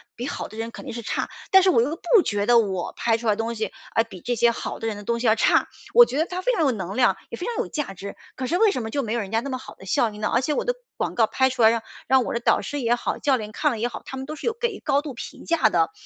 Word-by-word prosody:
比 245 +3 -4
好 - - -4
的 215 - -12
人 225 +1 -4
肯 - - -10
定 - - -6
是 235 - -5
差。 225 - -2 0.2
但 380 -1 +7
是 380 - +5
我 235 - +4
又 285 +7 0
不 365 +5 +4
觉 205 -1 -1
得 240 +2 +5
我 190 -5 -1
拍 230 -1 +2
出 230 0 -5
来 215 - +5
的 - - -14
东 230 +1 -2
西， 220 0 -3 0.2
啊 225 - +3
比 185 - -11
这 245 - -1
些 235 +1 +4
好 230 - -5
的 225 - -3
人 215 -2 -3
的 205 - -9
东 235 +3 -1
西 240 - 0
要 220 - +5
差， - - +3 0.3
我 480 0 +9
觉 275 - -4
得 320 - +2
它 360 +1 -4
非 - - +2
常 395 - 0
有 275 - +3
能 195 -4 -5
量， 245 -6 +4
也 235 - -6
非 355 - -5
常 480 - -3
有 - - -1
价 295 -10 -4
值。 200 +2 -8 0.2
可 255 - -3
是 345 - +1
为 430 +1 +5
什 255 - -3
么 220 - -4
就 280 +4 -1
没 220 -1 -3
有 235 - 0
人 195 -1 -7
家 225 - +2
那 275 - -5
么 260 - -2
好 255 - -11
的 190 - -14
效 220 +5 +2
应 210 0 -11
呢？ 210 - 0
而 240 - +3
且 300 +3 0
我 - - -1
的 - - +1 0.2
广 - - -2
告 225 -2 +4
拍 260 +3 +2
出 255 -1 -3
来 220 - +8
让 230 0 0 0.3
让 260 -1 +4
我 - - -3
的 235 - 0
导 - - +3
师 290 -1 -4
也 240 0 +2
好， - - -3
教 275 -3 +2
练 215 -2 -6
看 300 +6 +1
了 230 - -4
也 235 - +1
好， 230 -3 -7
他 265 - -7
们 265 - -5
都 305 +2 -6
是 310 - -6
有 460 - +2
给 475 - +2
予 - - -11
高 280 -1 +2
度 295 -3 -6
评 250 - -9
价 330 -10 +3
的。 165 -4 +2
240 Hz, 380 characters per minute, -24 LUFS, 220-285 Hz, 0.3 s, 我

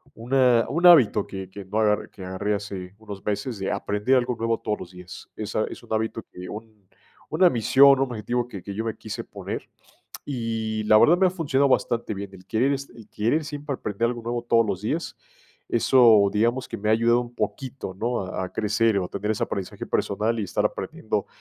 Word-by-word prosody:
una 125 0 +3
un 170 +4 0
hábito 125 - +6
que 95 -1 -7
que 100 0 -9
no 105 +3 -2
agarr 105 -1 +1
que 95 - -11
agarré 100 +3 -1
hace 100 -2 -7
unos 100 -3 -9
meses, 105 +1 -2
de 95 - -2
aprender 105 +6 0
algo 125 -1 0
nuevo 115 0 0
todos 105 -1 -2
los 90 - -9
días. 90 0 -11
Esa - - -2
es - - -9
un - - -6
hábito 110 0 -2
que 90 0 -9
un 105 -2 -10 0.4
una 175 +3 +5
misión, 135 +4 +6
un - - +1
objetivo 120 +2 -2
que 100 -7 -8
que 100 - -6
yo 110 +2 -3
me 110 - -2
quise 105 -1 -6
poner, - - -7 0.6
y 115 -4 -2
la 110 - +6
verdad 170 +10 +6
me 190 0 +4
ha - - +2
funcionado 140 -6 +1
bastante 120 -3 0
bien. 100 0 -6
El 95 -1 -14
querer 130 +6 +2
s 140 0 -5
el 115 -3 -13
querer 120 +9 0
siempre 145 -1 -5
aprender 110 0 -1
algo 120 -1 -5
nuevo 120 0 -3
todos 115 -1 +3
los 100 -2 -3
días, 155 +10 -3 0.5
eso, 115 -4 +5
digamos, 120 +4 +1
que - - -6
me 105 +2 -2
ha - - +5
ayudado 120 +2 +3
un 120 0 -9
poquito, 130 -8 -4
¿no?, 120 +1 -1
a 95 0 -4
a - - -8
crecer 105 0 +1
o 90 - -2
a - - -9
tener 105 +2 -2
ese 105 - -1
aprendizaje 95 -3 -4
personal 110 +3 0
y - - -1
estar - - -1
aprendiendo - - -3
110 Hz, 215 wpm, -24 LUFS, 100-125 Hz, 0.6 s, hábito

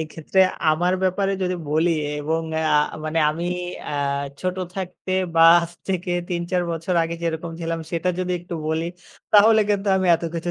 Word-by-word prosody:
এক্ষেত্রে 160 +4 -1 0.3
আমার 175 +4 +1
ব্যাপারে 195 +1 +1
যদি 185 0 0 0.2
বলি 160 +3 +2 0.3
এবং 160 +2 -1 0.2
আ 155 -1 +1 0.3
মানে 155 +1 -1
আমি 165 +3 -4 0.4
আ - - -4 0.5
ছোট 185 0 -2 0.2
থাকতে 185 0 -5 0.2
বা 165 - +5 0.2
আজ 170 0 -5 0.2
থেকে 180 -1 -1 0.2
৩-৪ 175 +1 -1
বছর 165 +2 -2
আগে 165 0 -3
যেরকম 165 0 -3
ছিলাম 165 0 -2
সেটা 170 +2 -1
যদি 180 0 -1
একটু 175 0 -7
বলি, 160 +1 -1 0.5
তাহলে 220 +1 +7
কিন্তু 205 0 0
আমি 185 -1 0
এতো 170 - -3
কিছু 170 +1 -2
170 Hz, 165 wpm, -22 LUFS, 165-185 Hz, 0.5 s, তাহলে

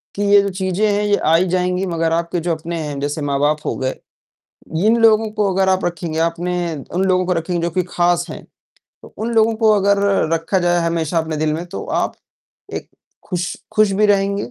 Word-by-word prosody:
कि 205 - -1
ये 205 0 +7
जो 200 - -1
चीज़ें 190 +2 -1
हैं 205 0 +1
ये 205 0 +3
आ 160 +1 +2
ही 180 +3 +3
जाएँगी 180 +1 0
मगर 165 -2 -1
आपके 170 +1 -1
जो - - +2
अपने 165 +2 -5
हैं 145 -1 -5
जैसे 145 +2 -3
माँ-बाप 145 +2 +1
हो - - -1
गए। 130 0 -1 0.9
इन 225 +2 +5
लोगों 220 -1 +4
को 210 -2 0
अगर 190 0 +2
आप 190 0 +1
रखेंगे 170 -2 -3
आपने 170 +2 -1 0.4
उन 185 +2 +1
लोगों 185 -1 +2
को 185 - +1
रखेंगे 170 0 -1
जो 170 - 0
कि 185 +2 0
ख़ास 175 0 +1
हैं - - -8 0.6
तो - - -15
उन 230 +2 -3
लोगों 225 0 +4
को 220 -1 +3
अगर 200 0 +3 0.4
रखा 165 +4 0
जाए 175 -1 +2
हमेशा 165 0 -1
अपने 160 -1 -1
दिल 155 0 0
में 165 +3 -4
तो 195 - -6 0.2
आप - - -2 0.6
एक - - -6 0.4
ख़ुश 180 -1 -2 0.2
ख़ुश 215 -1 +4
भी 215 - +5
रहेंगे। 200 0 +1
180 Hz, 210 wpm, -19 LUFS, 165-200 Hz, 0.9 s, ये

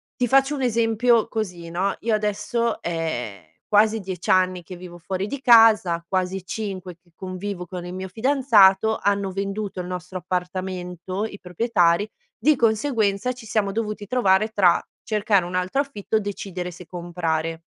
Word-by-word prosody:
Ti 250 - 0
faccio 270 +3 +3
un 275 - -4
esempio 230 -1 +2
così, 180 -6 -4
no? 190 +4 -1
Io 225 0 0
adesso 210 +3 -1
è 125 - -4 0.2
quasi 215 +1 +4
10 185 -3 -6
anni 185 -1 +3
che 185 - -9
vivo 175 -1 -10
fuori 185 +3 -3
di 280 +5 -5
casa, 220 -8 +6
quasi 185 0 -2
5 190 -4 -5
che 175 - -30
convivo 185 0 -5
con 175 0 -7
il 180 - -7
mio 190 +1 -5
fidanzato, 220 -3 +4
hanno 200 -1 0
venduto 195 +1 -4
il 180 - -4
nostro 180 +1 -6
appartamento- 180 +1 -4
i 205 -2 -8
proprietari- 180 0 +1 0.3
di 305 0 +3
conseguenza 225 -2 +1
ci 245 -2 -13
siamo 210 -2 0
dovuti 210 -1 -4
trovare 215 -3 +2
tra, 190 -5 +3 0.2
cercare 210 -4 +1
un 180 - -5
altro 185 +10 +1
affitto 220 -6 -2
o - - +1
decidere 190 -3 -5
se 175 +1 -12
comprare. 165 -2 -3
195 Hz, 160 wpm, -23 LUFS, 180-220 Hz, 0.3 s, casa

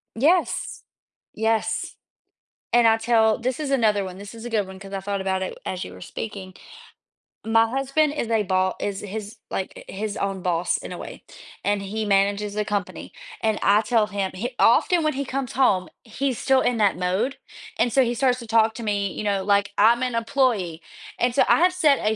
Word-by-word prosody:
Yes, 325 +9 +1 0.5
yes 225 0 -1 0.8
and 235 -1 +5
I 225 - +5
tell 225 -1 +3
this 255 +4 -2
is 285 -2 -3
another 215 -6 +2
one, 185 0 -8
this 200 +3 -10
is 230 +1 -10
a 240 - -5
good 210 -4 0
one 190 0 -10
'cause 195 -1 -10
I 195 - -2
thought 200 0 -3
about 190 0 -1
it - - -6
as 185 -1 -4
you 90 - -9
were 90 - -12
speaking, 190 - -7 0.9
my 225 0 +4
husband 275 +3 +1
is 235 - -2
a 220 -2 +2
bo 185 0 +1
is 200 -1 -2
his, 210 +2 -7
like, 190 - -3 0.2
uh, - - -8
his 205 +1 -3
own 195 -1 -2
boss 175 -1 0
in - - -8
a - - -7
way, - - -9 0.4
and 205 0 0
he 215 +3 -3
manages 200 +1 +1
a 210 -1 -1
company 205 -3 -4 0.3
and 220 -1 +1
I 205 +2 +4
tell 225 -2 +2
him, 200 -2 -2
hi 240 +6 -3
often 335 +8 +4
when 310 - +1
he 280 0 -2
comes 265 -1 -4
home, 200 -8 +2 0.2
he's 260 +2 -2
still 265 0 +3
in 245 -2 +1
that 205 -5 +2
mode 190 +9 -1 0.4
and 240 - +2
so 265 - +5
he 240 0 0
starts 255 0 +2
to 235 - -9
talk 225 0 +3
to 235 - -6
me, 200 -2 -1
you - - -5
know, 200 -2 0
like, 200 0 +2
I'm 235 +4 +5
an 250 -2 -1
employee 225 - 0 0.4
and 245 0 +1
so - - +5
I - - +6
have 365 +1 +4
set 305 -6 +3
a 215 +1 0
220 Hz, 210 wpm, -23 LUFS, 200-240 Hz, 0.9 s, I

